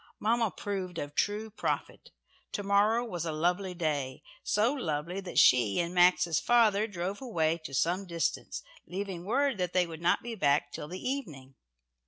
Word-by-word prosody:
Mamma 230 +1 +2
proved 190 -3 -5
a 145 -2 -4
true 210 +8 -1
prophet, 220 - -3 0.4
"To 205 - -2
morrow" 210 +4 +3
was 175 -8 -4
a 165 - -2
lovely 180 +4 0
day. 145 -6 -2 0.2
So 220 +6 +2
lovely 170 - -3
that 180 -2 -7
she 120 -6 +5
and 170 0 -1
Max's 175 -3 +4
father 220 -3 +3
drove 190 +1 -4
away 165 -10 0
to 135 - -7
some 180 +7 0
distance, 170 -1 -2 0.2
leaving 185 -2 -5
word 265 +1 +1
that 180 -1 -1
they 180 -1 +3
would 165 -1 -9
not 170 - +2
be 235 0 -5
back 145 -8 +1
till - - -6
the 180 +4 -6
evening. 155 - -5
180 Hz, 170 wpm, -30 LUFS, 165-210 Hz, 0.4 s, she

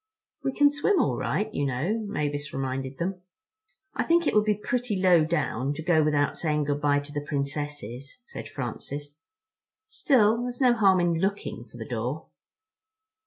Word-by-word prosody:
"We 270 - 0
can 290 +2 +4
swim 295 +7 +2
all - - +2
right, 215 +1 -1
you 145 - -1
know," 140 - 0
Mavis 145 -5 -2
reminded 135 0 -3
them. 180 +1 -3 0.7
"I - - -1
think 340 0 +3
it - - +2
would 210 0 +4
be 210 -1 +3
pretty 235 0 -2
low 180 -4 +5
down 140 -4 -1
to 160 - -6
go 165 -2 +4
without 145 -1 +1
saying 150 -2 0
good 145 0 -1
bye 145 -1 +3
to 145 +1 -11
the 145 0 -3
Princesses," 140 - -4
said - - -8
Francis. 140 +3 -5 0.7
"Still, 245 - +3
there's 245 0 -4
no 255 -3 +5
harm 195 -5 +4
in 170 -2 +1
looking 195 +3 -2
for - - -14
the - - -6
door." - - -3
155 Hz, 170 wpm, -27 LUFS, 145-210 Hz, 0.7 s, low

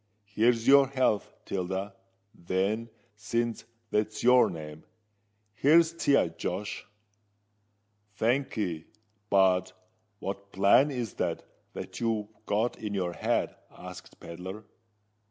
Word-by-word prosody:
Here's 115 +3 +1
your 140 0 +7
health, 130 -6 0
Tilda, 95 +1 -3 0.4
then—since 110 +4 -3 0.3
that's 105 +1 -1
your 125 +1 +6
name: 75 -1 -8 0.7
here's 160 +9 +4
to 165 -3 0
ye, 115 - +4
Josh." 100 +3 -4 1.3
"Thank'ee. 110 - -1 0.4
But 95 -1 +3 0.4
what 100 0 -6
plan 100 +10 +5
is 125 -6 -4
it - - -1 0.3
that - - -7
you've 110 -3 -1 0.2
got 110 +4 0
in 105 -2 -4
your 90 -3 -1
head?" - - -1
asked - - -12
Pedler. 95 +5 -8
105 Hz, 100 wpm, -29 LUFS, 95-120 Hz, 1.3 s, your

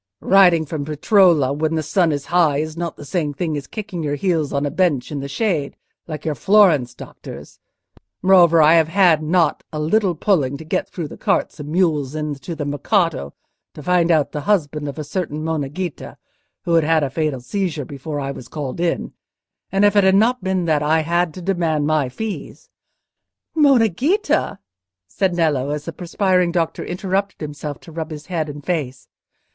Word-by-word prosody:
"Riding 180 -4 +5
from 150 -1 -4
Peretola, 155 -1 +3
when 155 +2 -1
the 160 - -1
sun 165 +2 +1
is 145 -2 -3
high, 165 -5 +4
is 155 +1 -3
not 170 -1 -4
the 145 - -10
same 150 -2 -2
thing 160 0 -2
as 140 -2 -5
kicking 210 -5 -6
your 145 -2 -1
heels 160 -3 0
on 140 +1 -1
a 145 - -2
bench 155 -6 0
in 145 - -3
the 140 - -5
shade, 155 -3 -2 0.3
like 155 -2 -7
your 155 - 0
Florence 155 - +3
doctors. - - -11 0.6
Moreover, 175 -4 +6
I 155 +2 +6
have 165 -2 +4
had 170 -3 +4
not 160 0 +1
a 155 - -5
little 180 +4 +1
pulling 145 -7 +1
to 160 - -10
get 190 +5 -2
through 170 -5 -5
the - - -12
carts - - 0
and 145 0 -7
mules 155 -5 0
into 150 0 -4
the 150 -1 -4
Mercato, 145 - -1 0.4
to 150 - -9
find 180 0 +2
out 155 -4 +2
the 150 - -4
husband 150 -7 0
of 140 - -6
a 155 - -4
certain 155 -1 -4
Monna 155 -4 -2
Ghita, 175 +2 -6 0.5
who 170 - -1
had 165 -1 +4
had 160 0 +2
a 135 - -2
fatal 155 -2 -1
seizure 160 +2 -3
before 145 +2 -6
I 135 -1 -3
was 125 -3 -9
called 145 +1 -5
in; 175 -1 -1 0.6
and 195 +1 +3
if 205 - +3
it 205 - +5
had 190 0 +4
not 230 +3 +2
been 185 -2 0
that 155 -3 +1
I 155 +2 +2
had 170 +1 0
to 185 - -8
demand 165 -5 0
my 150 -3 +1
fees—" 215 - -7 0.8
"Monna 275 -7 +5
Ghita!" 305 - 0 0.5
said 175 - -1
Nello, 150 -5 +1
as 150 0 -4
the 165 - -5
perspiring 180 +1 +1
doctor 170 -2 -1
interrupted 195 +2 -2
himself 150 -1 -6
to 165 - -13
rub 160 0 -5
his 150 -1 -8
head 165 -4 -3
and 145 -1 -9
face. 145 -8 -3
160 Hz, 195 wpm, -20 LUFS, 145-180 Hz, 0.8 s, Moreover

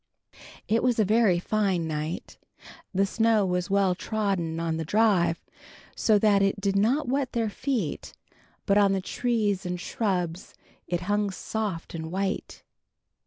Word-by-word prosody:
VII. - - -23 0.3
It 225 +1 +2
was 250 -2 +2
a 215 - +3
very 210 -3 +3
fine 190 -3 0
night. 155 +2 -5 0.5
The 195 0 +2
snow 220 0 +2
was 180 0 -1
well 195 -2 +3
trodden 190 -5 -2
on 165 -1 -1
the 160 - -2
drive, 180 -3 +2 0.5
so 215 -2 +3
that 205 -1 +4
it 195 +1 +1
did 200 0 0
not 240 +10 +2
wet 265 0 -1
their 225 -3 0
feet, 240 - -3 0.5
but 200 +1 +4
on 200 -1 +4
the 190 - 0
trees 210 -2 -1
and 180 -1 -3
shrubs 180 -3 -2 0.3
it 175 0 -1
hung 205 +2 0
soft 195 -2 -4
and 160 -1 -5
white. 195 +1 -3
195 Hz, 155 wpm, -26 LUFS, 180-220 Hz, 0.5 s, that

